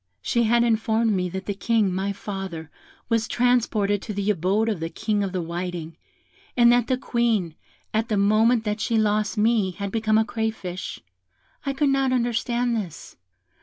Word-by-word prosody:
"She 235 -1 +1
had 235 +2 +4
informed 225 0 +2
me 180 -3 0
that 190 +2 -6
the 205 - -2
King, 210 -1 +1
my 195 +2 -1
father, 190 -6 -6 0.4
was 230 -1 +1
transported 220 -5 +1
to 210 - -6
the 200 +1 +1
abode 200 +4 +1
of 210 -6 -1
the 165 0 -3
King 210 +2 -1
of 195 - -2
the 180 -2 -2
Whiting; 170 -1 -5 0.6
and 240 -1 +7
that 245 -1 +2
the 255 - +1
Queen, 235 - 0 0.4
at 220 +1 0
the 215 - +1
moment 220 +4 +3
that 210 0 -2
she 230 - +1
lost 210 -2 +1
me, 215 -2 +3
had 200 +2 -5
become 220 0 +2
a 220 - +3
crayfish. 220 -6 -4 0.7
I 275 - +1
could 285 +1 +1
not 270 -1 +2
understand 240 0 0
this. 185 -8 -6
215 Hz, 175 wpm, -24 LUFS, 195-235 Hz, 0.7 s, and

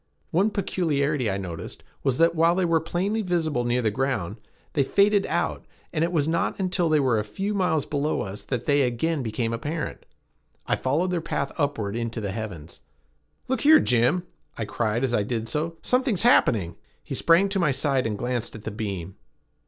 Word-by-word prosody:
One 190 +6 +3
peculiarity 150 - 0
I 95 - -1
noticed 85 -4 -7 0.2
was 135 -3 +1
that, 165 +1 +4
while 165 +1 +3
they 185 -1 +1
were 165 -1 +3
plainly 195 +7 -1
visible 160 - 0
near 120 +1 +1
the 110 - +2
ground, 125 -6 -2 0.4
they 145 - +2
faded 200 +7 +3
out, - - -1 0.3
and 160 -1 +1
it 170 - 0
was 155 -4 +1
not 165 +4 0
until 180 -3 +1
they 155 -1 +4
were 125 -5 +2
a - - -1
few 195 - -3
miles 180 -7 +1
below 150 +1 -1
us 100 +1 -6
that 120 -1 -3
they 145 -1 +3
again 135 +5 0
became 115 0 -2
apparent. 150 +6 -4 0.6
I - - +1
followed 160 +8 0
their 175 -2 0
path 140 -4 -2
upward 115 -10 -1
into 115 0 -3
the 100 -3 -3
heavens. 95 -7 -7 0.7
"Look 260 - -1
here, 310 +1 +7
Jim!" 125 +9 +2 0.3
I 115 - -2
cried 110 +2 -1
as 130 -2 0
I 105 - +3
did 115 +2 -3
so. 160 +7 -2
"Something's 250 -6 +2
happening!" 105 - +3 0.3
He - - -6
sprang 170 +4 +4
to 195 0 0
my 170 -5 +3
side 135 -2 +1
and 105 -2 -3
glanced 120 0 -2
at 110 - -10
the 110 - -4
beam. 100 -4 -5
140 Hz, 190 wpm, -25 LUFS, 115-170 Hz, 0.7 s, here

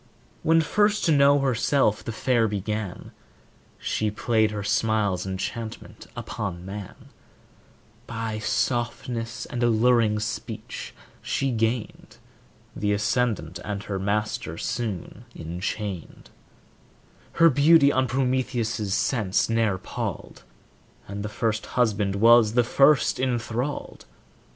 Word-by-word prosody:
When 165 +1 +4
first 205 +6 +2
to 165 - +3
know 140 -1 +5
herself 125 -3 +1
the - - -4
fair 115 0 +1
began, 105 -1 -4 0.7
She 110 - -1
played 110 +1 +1
her 105 -1 -4
smile's 100 -3 0
enchantment 105 +4 -6
upon 85 +1 -5
man; 100 0 -9 1.0
By 115 -2 -4
softness 115 0 -2
and 120 - -5
alluring 115 -2 +3
speech 115 0 -6 0.3
she 135 -1 -1
gained 115 0 -2 0.6
The 105 0 0
ascendant, 105 -5 -1
and 100 -1 -4
her 100 -2 -4
master 100 -4 -2
soon 110 +1 -4
enchained; 90 +2 -5 1.0
Her 165 -1 +5
beauty 145 +1 +6
on 130 -1 +1
Prometheus' 125 -5 -1
sense 110 -7 +1
ne'er 115 -4 +1
palled, - - -6 0.7
And 100 +1 -5
the 105 - -4
first 110 +1 -2
husband 105 -5 +1
was 115 +1 +6
the 120 0 +4
first 135 +4 +3
enthralled. 125 +2 -3
110 Hz, 110 wpm, -25 LUFS, 105-125 Hz, 1.0 s, beauty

